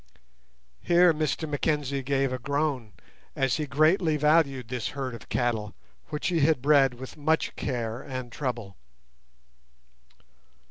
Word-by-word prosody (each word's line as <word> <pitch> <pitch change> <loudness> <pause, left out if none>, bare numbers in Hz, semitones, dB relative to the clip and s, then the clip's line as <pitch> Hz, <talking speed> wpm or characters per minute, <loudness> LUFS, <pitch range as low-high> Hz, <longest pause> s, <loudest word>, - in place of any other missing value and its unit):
Here 175 0 +5
Mr 155 +1 -1
Mackenzie 145 -2 -1
gave 135 0 0
a 130 - -3
groan, 140 -4 -2 0.4
as 135 -3 +1
he 150 - -3
greatly 155 +3 +3
valued 150 -5 +2
this 125 -1 -3
herd 130 -2 -3
of 115 - -11
cattle, 110 -4 -1 0.3
which 150 - -2
he 170 -2 +1
bred 140 -2 +3
with 130 +4 -10
much 155 +2 0
care 120 -2 -3
and 130 -3 -6
trouble. 120 -8 -4
135 Hz, 125 wpm, -27 LUFS, 125-150 Hz, 0.4 s, Here